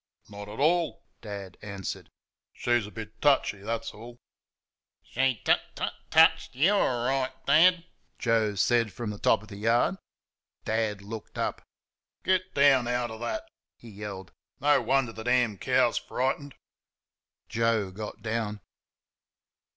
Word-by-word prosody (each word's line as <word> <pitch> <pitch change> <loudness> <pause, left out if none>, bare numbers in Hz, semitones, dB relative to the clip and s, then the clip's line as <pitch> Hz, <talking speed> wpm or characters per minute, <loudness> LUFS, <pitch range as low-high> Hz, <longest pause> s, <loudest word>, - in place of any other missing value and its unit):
"Not 100 0 -9
at 105 - -8
all," 165 +1 +1 0.2
Dad 100 -4 -8
answered; 100 -2 -6 0.4
"she's 120 -3 0
a - - -11
bit 110 0 -9
touchy, 140 -8 +3
that's 115 +3 -3
all." 120 +3 -11 0.9
"She 135 -4 0
tut - - +4
tut - - -2 0.2
TUTCHED 160 -2 +4
YOU 165 +10 +4
orright, 130 -6 +1
Dad," 175 +1 +5 0.3
Joe 110 -3 +1
said 115 +2 +2
from 115 -1 -5
the 105 - -8
top - - +3
of 110 - -14
the 100 - -9
yard. 115 - +2 0.7
Dad 110 -2 -1
looked 110 +1 -8
up. - - -2 0.6
"Get 185 0 0
down 135 -3 +5
outer 120 -2 -2
THAT!" 320 - -4 0.3
he 115 - -13
yelled. 100 -3 -7 0.3
"No 145 0 +4
wonder 130 -3 +1
the 110 - -8
damn 120 -4 +1
cow's - - +2
frightened." 135 +2 -2 0.9
Joe 115 -4 0
got 105 +2 -8
down. 110 -2 -2
115 Hz, 135 wpm, -28 LUFS, 105-135 Hz, 0.9 s, Dad